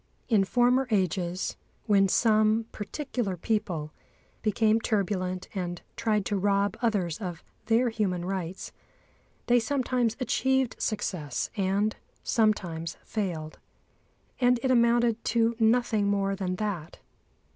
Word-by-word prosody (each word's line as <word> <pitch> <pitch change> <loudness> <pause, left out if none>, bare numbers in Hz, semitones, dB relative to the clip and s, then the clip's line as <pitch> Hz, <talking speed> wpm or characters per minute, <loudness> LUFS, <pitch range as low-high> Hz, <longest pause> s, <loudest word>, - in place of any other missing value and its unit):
In 210 -5 +4
former 250 +4 +3
ages, 185 -3 -1 0.3
when 200 -3 +4
some 215 +2 +3
particular 220 -3 -3
people 175 -6 -2 0.5
became 220 +1 +2
turbulent 185 -4 -1
and 175 -3 -4
tried 215 -3 0
to 205 - 0
rob 200 0 +1
others 200 -9 0
of 175 -4 -5 0.2
their 235 +2 +3
human 190 -6 -1
rights, 185 -1 -4 0.7
they 245 0 +4
sometimes 250 -2 0
achieved 265 -1 +1
success 180 - -2
and 200 +2 0 0.3
sometimes 175 -7 0
failed. 170 -7 -4 0.8
And 250 -1 +4
it 260 - +2
amounted 235 -1 +3
to 230 0 +2
nothing 225 -2 +3
more 195 -1 +1
than 185 -2 -2
that. 180 -5 -4
210 Hz, 115 wpm, -28 LUFS, 185-230 Hz, 0.8 s, In